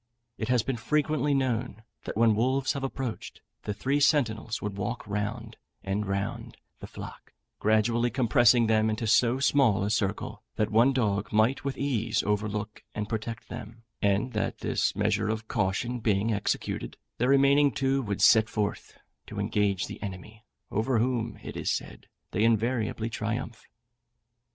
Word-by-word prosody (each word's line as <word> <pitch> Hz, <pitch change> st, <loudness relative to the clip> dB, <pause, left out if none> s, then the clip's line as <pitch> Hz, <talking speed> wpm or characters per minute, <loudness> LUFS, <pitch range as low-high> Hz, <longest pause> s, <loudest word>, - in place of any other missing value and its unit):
It 110 Hz, -, -2 dB
has 125 Hz, -3 st, +3 dB
been 135 Hz, -3 st, -2 dB
frequently 150 Hz, +3 st, +1 dB
known, 125 Hz, -4 st, -1 dB, 0.2 s
that -, -, -5 dB
when 115 Hz, -1 st, +5 dB
wolves 130 Hz, +5 st, +1 dB
have 140 Hz, -, -4 dB
approached, 135 Hz, -3 st, -5 dB, 0.2 s
the 105 Hz, -, -2 dB
three 135 Hz, +8 st, 0 dB
sentinels 115 Hz, -7 st, +1 dB
would 105 Hz, -1 st, -4 dB
walk 105 Hz, +5 st, -4 dB
round 110 Hz, +3 st, -4 dB, 0.3 s
and 100 Hz, +1 st, -2 dB
round 100 Hz, 0 st, -3 dB, 0.2 s
the -, -, -8 dB
flock, -, -, -10 dB, 0.3 s
gradually 115 Hz, +3 st, +2 dB
compressing 120 Hz, -1 st, +4 dB
them 110 Hz, 0 st, +3 dB
into 110 Hz, +2 st, -2 dB
so 120 Hz, +3 st, +4 dB
small 130 Hz, -8 st, +3 dB
a 100 Hz, -, -1 dB
circle 100 Hz, -3 st, -2 dB
that 105 Hz, -1 st, 0 dB
one 115 Hz, +5 st, +5 dB
dog 105 Hz, -6 st, 0 dB
might 110 Hz, +5 st, +2 dB
with 140 Hz, -1 st, -3 dB
ease 120 Hz, -6 st, 0 dB
overlook 105 Hz, 0 st, -2 dB
and 105 Hz, -1 st, -3 dB
protect 115 Hz, 0 st, -4 dB
them, 115 Hz, +2 st, -9 dB, 0.2 s
and 105 Hz, +4 st, +1 dB
that -, -, -2 dB
this -, -, 0 dB
measure 105 Hz, +1 st, +1 dB
of 110 Hz, 0 st, -3 dB
caution 110 Hz, +5 st, -1 dB
being 110 Hz, 0 st, +1 dB
executed, 100 Hz, -, -2 dB, 0.2 s
the 125 Hz, +2 st, +2 dB
remaining 140 Hz, +1 st, +5 dB
two 135 Hz, +4 st, 0 dB
would 105 Hz, -5 st, -2 dB
set 110 Hz, 0 st, +6 dB
forth 105 Hz, -1 st, -3 dB, 0.3 s
to -, -, -6 dB
engage 100 Hz, -3 st, 0 dB
the -, -, -9 dB
enemy, 105 Hz, +3 st, -8 dB, 0.3 s
over 115 Hz, +4 st, +1 dB
whom, 115 Hz, -1 st, 0 dB
it -, -, -7 dB
is -, -, -2 dB
said, -, -, -4 dB, 0.2 s
they 105 Hz, -, +1 dB
invariably 115 Hz, 0 st, +1 dB
triumph. 115 Hz, 0 st, -4 dB
110 Hz, 155 wpm, -28 LUFS, 105-125 Hz, 0.3 s, set